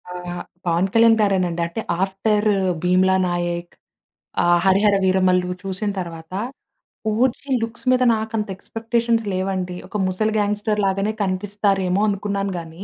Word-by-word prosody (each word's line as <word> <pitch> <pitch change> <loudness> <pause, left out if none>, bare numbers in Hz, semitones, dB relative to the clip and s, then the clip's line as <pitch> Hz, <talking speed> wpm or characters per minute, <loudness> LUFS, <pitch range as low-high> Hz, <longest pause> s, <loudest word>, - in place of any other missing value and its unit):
ఆహ్, 180 0 -6 0.2
పవన్ 170 +2 +2
కళ్యాణ్ 230 0 +6
గారే 200 -2 +3
నండి. 170 -1 -3
అంటే 170 +7 -5 0.2
ఆఫ్టర్ 210 +2 0 0.4
'భీమ్లా 185 +1 +3
నాయక్' 175 0 -3 0.7
ఆహ్, 175 0 +4
'హరిహర 200 +2 +4
వీరమల్లు' 185 -1 +2
చూసిన 195 +2 -2
తరువాత 165 -1 -7 0.8
'ఓజీ' 255 +4 0
లుక్స్ 230 +3 -5
మీద 255 0 +3
నాకంత 220 -1 -2
ఎక్స్‌పెక్టేషన్స్ 230 +2 -1
లేవండి. 185 -1 -2
ఒక 200 - -4
ముసలి 215 +4 0
గ్యాంగ్‌స్టర్ 210 +1 0
లాగానే 195 +2 0
కనిపిస్తారేమో 195 0 0
అనుకున్నాను 200 -1 -2
గాని, 165 +2 -9
195 Hz, 125 wpm, -21 LUFS, 180-215 Hz, 0.8 s, కళ్యాణ్